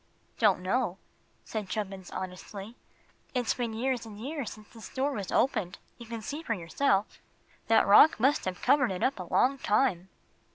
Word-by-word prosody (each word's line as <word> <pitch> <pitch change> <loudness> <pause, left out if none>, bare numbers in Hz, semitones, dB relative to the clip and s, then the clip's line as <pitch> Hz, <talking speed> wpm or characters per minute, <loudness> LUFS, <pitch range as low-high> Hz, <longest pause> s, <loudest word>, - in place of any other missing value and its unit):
"Don't 205 -5 +4
know," 195 0 0 0.5
said 215 -4 -5
Chubbins, 195 -4 -4
honestly. 190 +4 -7 0.6
"It's 245 -2 +1
been 240 -2 -3
years 245 +2 -1
and 215 -2 -10
years 275 0 -4
since 215 -1 -15
this 225 -2 -11
door 270 +2 -1
was 205 -8 -4
opened. 215 -9 +1 0.2
You 235 - -10
can 230 -1 -6
see 295 +7 -5
for 230 -8 -2
yourself. 195 +4 0 0.5
That 225 - +5
rock 225 +7 +7
must 270 +5 +2
have 185 -1 -4
covered 280 -4 +4
it 180 - -3
up 265 -5 +1
a 180 - -7
long 270 +2 +3
time." 205 -6 +1
220 Hz, 170 wpm, -29 LUFS, 195-255 Hz, 0.6 s, rock